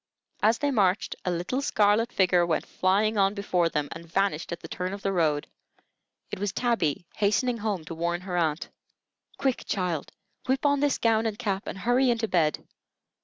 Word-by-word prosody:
As 220 +2 +4
they 290 -1 0
marched, 200 -5 +1
a - - +1
little 180 +10 -1
scarlet 215 -2 +2
figure 180 -2 +3
went 170 -2 0
flying 205 +3 +1
on 195 +1 +3
before 180 -4 +1
them, 150 -2 -1
and 165 - -7
vanished 195 -4 0
at 170 - -5
the - - -8
turn 185 +1 -4
of 200 0 -7
the 195 - 0
road. 155 -5 +1 0.9
It - - -4
was 205 0 -1
Tabby 195 - 0
hastening 230 +4 +1
home 205 -6 -2
to 165 - -6
warn 170 +1 -2
her 185 -1 -5
aunt. 160 -2 0 0.7
"Quick 265 -3 0
child, 180 -6 -2 0.4
whip 265 +2 0
on 285 -1 +3
this 290 -1 +2
gown 225 -1 +2
and 210 -2 -3
cap 195 -2 -2
and - - -5
hurry 245 +6 +2
into 230 -2 +1
bed. 160 -6 +1
195 Hz, 185 wpm, -27 LUFS, 175-225 Hz, 0.9 s, As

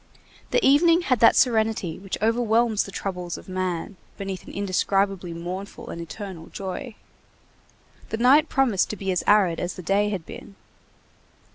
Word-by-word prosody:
The - - +2
evening 330 +5 +5
had 255 -9 +1
that 230 - +6
serenity 220 -8 +1
which 195 0 -5
overwhelms 230 -1 +2
the 195 - -9
troubles 180 -3 -4
of - - -13
man 185 0 -3 0.2
beneath 195 -2 -5
an - - -8
indescribably 195 -1 0
mournful 180 +4 -7
and 170 - -6
eternal 175 -1 -8
joy. 195 +5 -6 1.1
The 220 - -2
night 275 +6 +5
promised 240 -9 +2
to - - -3
be 195 -1 -3
as 180 - 0
arid 195 -5 +4
as 175 - -3
the 180 - -8
day 205 +3 +2
had 190 -6 -4
been. 200 - -11
195 Hz, 155 wpm, -24 LUFS, 185-225 Hz, 1.1 s, that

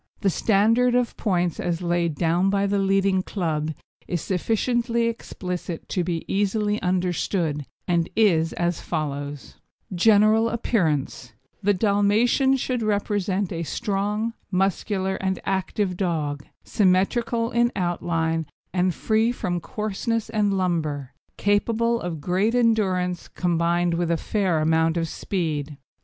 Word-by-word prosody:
The 195 - +2
standard 230 +6 +3
of 245 -1 +1
points 180 -5 0
as 175 0 -2
laid 170 -2 0
down 170 +4 +2
by 200 0 +1
the 200 0 +1
leading 195 -1 +2
club 160 -6 -2 0.4
is 175 - -1
sufficiently 230 +6 0
explicit 180 -7 -4
to 180 - 0
be 170 -2 -3
easily 205 +1 0
understood, 175 -4 -1 0.2
and 170 -2 +1
is 170 -7 +3
as 175 -1 -1
follows: 145 -3 -4 0.4
GENERAL 215 +4 +4
APPEARANCE 160 - -1 0.3
The 205 0 +2
Dalmatian 215 +7 +3
should 250 -1 -2
represent 205 -2 0
a 165 - -3
strong, 210 +4 -2 0.2
muscular, 190 0 0
and 190 -1 -2
active 190 0 -1
dog, 150 -6 -2 0.2
symmetrical 230 +5 +1
in 240 +1 +2
outline, 165 -3 -1 0.3
and 180 -1 +1
free 220 +2 +2
from 180 -7 -2
coarseness 215 +4 -3
and 205 -3 +1
lumber, 155 -7 -1 0.3
capable 230 +3 +1
of 170 -3 -4
great 190 +8 +1
endurance 190 -7 +1
combined 175 0 0
with 170 0 0
a 170 - +2
fair 185 -4 0
amount 160 +1 +2
of 165 -1 0
speed. 155 -5 -3
190 Hz, 125 wpm, -24 LUFS, 170-215 Hz, 0.4 s, GENERAL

